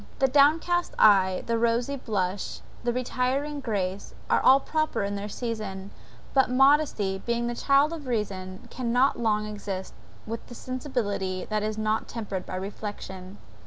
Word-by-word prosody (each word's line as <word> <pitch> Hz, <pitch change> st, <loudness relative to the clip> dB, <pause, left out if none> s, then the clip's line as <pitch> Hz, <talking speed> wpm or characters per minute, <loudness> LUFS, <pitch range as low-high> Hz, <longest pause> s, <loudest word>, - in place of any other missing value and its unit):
the 270 Hz, -, +3 dB
downcast 315 Hz, +6 st, +3 dB
eye, 190 Hz, -3 st, +5 dB
the 230 Hz, -1 st, 0 dB
rosy 235 Hz, +4 st, +1 dB
blush, 200 Hz, -7 st, -2 dB, 0.2 s
the 240 Hz, -, +1 dB
retiring 255 Hz, +4 st, -1 dB
grace, 200 Hz, -6 st, -3 dB, 0.2 s
are -, -, +4 dB
all 265 Hz, +1 st, +7 dB
proper 310 Hz, -5 st, -1 dB
in 200 Hz, 0 st, -2 dB
their 200 Hz, +1 st, -4 dB
season; 205 Hz, -4 st, -5 dB, 0.4 s
but 265 Hz, -2 st, +4 dB
modesty, 260 Hz, -7 st, +3 dB
being 235 Hz, 0 st, 0 dB
the 240 Hz, -, -1 dB
child 280 Hz, +5 st, +3 dB
of 300 Hz, -5 st, -7 dB
reason, 190 Hz, -5 st, -3 dB
cannot 250 Hz, +2 st, +1 dB
long 215 Hz, -2 st, +1 dB
exist 200 Hz, -3 st, -5 dB, 0.3 s
with 225 Hz, +1 st, -5 dB
the 240 Hz, -, -10 dB
sensibility 225 Hz, -8 st, -3 dB
that 215 Hz, 0 st, +1 dB
is 215 Hz, 0 st, -2 dB
not 215 Hz, 0 st, 0 dB
tempered 205 Hz, -5 st, -5 dB
by -, -, -4 dB
reflection. 190 Hz, -1 st, -6 dB
225 Hz, 150 wpm, -27 LUFS, 200-260 Hz, 0.4 s, all